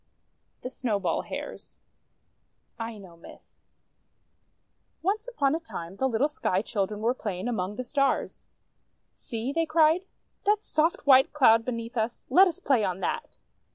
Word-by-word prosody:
THE 250 - -5
SNOWBALL 205 -10 -1
HARES - - -7 1.0
Aino 205 -7 -7
Myth 165 - -16 1.5
ONCE 425 +6 -1
upon 285 - +1
a 320 - 0
time, 190 - -8
the 265 +3 +1
little 245 +4 +2
Sky 200 -10 -1
Children 210 -1 -2
were 235 +3 +2
playing 205 -5 -4
among 205 -4 -2
the 255 - -4
Stars. 275 +1 -1 0.7
"See," 235 +4 -5
they 330 +1 0
cried, 320 +2 +4 0.5
"that 420 0 +3
soft, 315 +2 0
white 265 -1 +6
Cloud 230 -6 +5
beneath 230 0 -5
us! 225 +2 -2
Let 375 +8 +7
us 335 - -4
play 255 -6 +2
on 185 -2 -1
that! - - -3
245 Hz, 140 wpm, -27 LUFS, 210-300 Hz, 1.5 s, Let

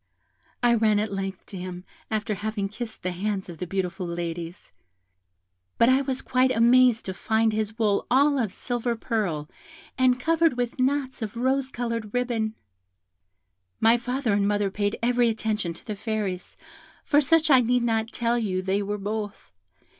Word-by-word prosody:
I 240 0 +5
ran 215 -2 +3
at 210 -1 -1
length 195 -1 -4
to 195 - -9
him, 180 0 -6 0.3
after 215 0 -1
having 205 -1 -3
kissed 220 0 -7
the 185 - -1
hands 190 +1 -3
of 170 - -9
the 180 - -4
beautiful 185 0 -2
ladies; 170 0 -5 1.1
but 230 - +5
I 260 +1 +4
was 265 -1 -3
quite 255 +1 +2
amazed 245 0 +4
to 190 - -3
find 220 +3 +1
his 215 0 -2
wool 210 -3 +1
all 280 +3 +4
of 220 -6 0
silver 240 +1 -2
purl, 200 -11 -2 0.5
and 255 -1 +4
covered 325 0 +2
with 245 +1 -2
knots 260 0 0
of 220 +1 -5
rose 260 +2 +1
coloured 230 -3 -4
ribbon. 230 -3 -1 1.2
"My 225 +1 +5
father 245 -1 -1
and 200 0 +2
mother 205 -1 +1
paid 205 +1 -1
every 240 0 +3
attention 215 -5 -1
to - - -14
the 215 - -4
Fairies, 205 -4 -4 0.5
for 290 0 +4
such 315 +1 +3
I 260 -2 +7
need 245 +1 +2
not 225 -1 +1
tell 240 0 0
you 185 -4 -1
they 195 +2 0
were 205 +1 -2
both. 205 - -5
220 Hz, 170 wpm, -25 LUFS, 200-245 Hz, 1.2 s, I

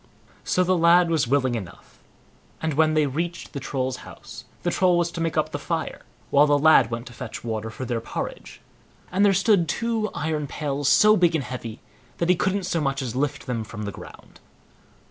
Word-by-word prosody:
So 185 - +1
the 185 +1 +2
lad 170 0 +5
was 150 -7 +1
willing 130 -1 +1
enough; 100 -7 -8 0.6
and 160 -1 -2
when 155 +1 +3
they 155 -1 +3
reached 170 +5 -4
the 140 - -4
Troll's 130 -1 -3
house, - - -11 0.2
the - - 0
Troll 180 -2 +3
was 170 0 0
to 170 - -5
make 165 -1 -1
up - - +1
the - - -4
fire, - - -3 0.3
while 145 +1 +5
the 145 0 +4
lad 145 -5 +5
went 115 +1 -4
to 120 - -11
fetch 120 -2 -7
water 110 -1 -3
for 130 +4 -6
their 120 -1 -2
porridge, - - -6 0.5
and 190 +3 +2
there 205 - +6
stood 195 -3 +3
two 225 +2 -1
iron 150 -1 -2
pails 145 -1 -2
so 215 0 +6
big 175 -4 +3
and 150 - 0
heavy, 120 -3 -7 0.4
that 170 - -1
he 180 - +6
couldn't 195 +2 0
so 175 -2 -1
much 135 -1 -1
as 120 -3 -5
lift 145 +2 -2
them 120 -4 -2
from 105 0 -8
the 100 - -4
ground. - - -13
150 Hz, 205 wpm, -24 LUFS, 130-175 Hz, 0.6 s, there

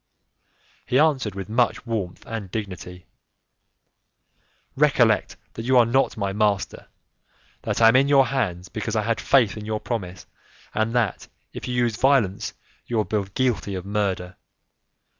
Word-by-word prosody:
He 125 0 +2
answered 135 -9 +2
with 95 -1 -5
much 120 +2 +1
warmth 105 -7 -4
and 110 -4 -6
dignity: 90 -3 -6 1.7
"Recollect 125 -7 +3 0.2
that - - -6
you 130 +1 +4
are 120 - +7
not 130 +2 +1
my 100 -2 -2
master, 105 -1 -1 0.7
that - - -2
I 115 - +9
am 115 - +3
in 135 +2 +5
your 140 -2 +5
hands, 95 -11 -2
because 110 +4 -4
I 110 - +1
had 115 +1 -1
faith 120 -7 +3
in 105 - -7
your 110 -1 -2
promise, 95 -7 -5 0.5
and 110 +2 0
that, 115 -6 0 0.3
if - - -7
you 125 - -2
use 120 -3 +1
violence, 130 -8 +2 0.3
you 120 - -2
will 110 - +3
be 105 -1 -1
guilty 120 -6 0
of 90 0 -5
murder. 95 -3 -2
110 Hz, 155 wpm, -24 LUFS, 100-125 Hz, 1.7 s, I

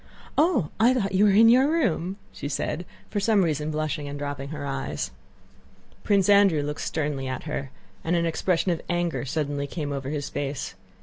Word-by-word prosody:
"Oh! 290 - +2
I 240 +4 +5
thought 195 -6 0
you 195 +2 +4
were - - +6
in 215 +3 +7
your 255 +5 +6
room," 200 - 0
she 145 - -6
said, 160 +3 -3 0.2
for 210 - 0
some 205 -1 +3
reason 155 -2 -1
blushing 155 -1 -2
and 140 0 -5
dropping 145 -1 -4
her 150 -2 -5
eyes. 135 -1 -3 0.9
Prince 200 -2 +3
Andrew 200 -7 +5
looked 150 +1 -4
sternly 145 -4 -2
at 130 0 -4
her 145 -3 -4 0.3
and 165 +2 +1
an 170 0 +2
expression 175 +2 +1
of 170 - -2
anger 175 -4 -1
suddenly 145 0 -2
came 145 -1 -4
over 135 -1 -3
his 145 -1 -3
face. 140 -7 -4
160 Hz, 185 wpm, -26 LUFS, 145-195 Hz, 0.9 s, in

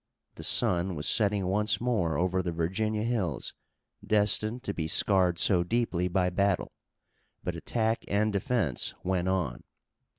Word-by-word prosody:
The - - -10
sun 90 0 +1
was 75 -1 -4
setting 105 -3 +1
once 105 +3 +1
more 100 -11 0
over 95 +2 +1
the 90 -1 -3
Virginia 105 +6 -1
hills 110 -9 -2 0.5
destined 110 +3 +1
to 100 - -3
be 80 -4 -3
scarred 90 0 +4
so 90 0 +3
deeply 95 -3 0
by 90 0 +1
battle, 100 0 0 0.7
but - - -2
attack 115 -1 -1
and 105 +1 +1
defense 105 - -1
went 90 -1 0
on. 95 -2 -1
95 Hz, 140 wpm, -29 LUFS, 90-110 Hz, 0.7 s, scarred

